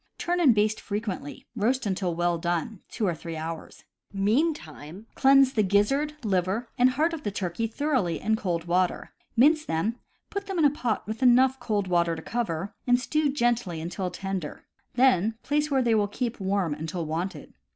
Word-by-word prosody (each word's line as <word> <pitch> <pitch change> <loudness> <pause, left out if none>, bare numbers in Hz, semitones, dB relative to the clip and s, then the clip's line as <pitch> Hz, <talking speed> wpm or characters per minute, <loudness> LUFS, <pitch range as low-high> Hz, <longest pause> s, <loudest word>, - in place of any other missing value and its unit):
Turn 350 +1 -1
and 275 -10 +5
baste 215 +1 +1
frequently. 205 -8 -5
Roast 240 +3 0
until 185 -3 -1
well 175 0 0
done 175 +4 -2
(two 225 - -2
to 180 - +1
three 165 +1 -7
hours). 160 0 -7 0.3
Meantime 200 - -1
cleanse 270 -1 +5
the 220 - +2
gizzard, 210 +10 +1
liver, 195 +3 0
and 250 0 +5
heart 310 +6 +1
of 325 - -5
the 240 - -2
turkey 195 +2 -2
thoroughly 230 - -1
in 220 +1 +1
cold 175 -6 -2
water; 180 +1 0 0.3
mince 305 +5 +5
them; 210 - -2 0.3
put 400 0 -4
them 385 -2 -3
in 320 - +4
a 285 - +5
pot 245 -7 -2
with 220 +4 -6
enough 260 +1 +5
cold 210 -5 -1
water 170 -2 +2
to 160 - -7
cover, 205 -5 -3
and 245 0 +4
stew 300 +2 0
gently 240 - 0
until 180 +3 -3
tender; 190 -5 -5 0.3
then 225 -4 +3
place 295 +1 0
where 270 -3 +2
they 235 -1 +2
will 210 -2 +2
keep 235 +3 -3
warm 190 -4 0
until 160 +3 -4
wanted. 170 +5 -4
215 Hz, 180 wpm, -26 LUFS, 175-255 Hz, 0.3 s, and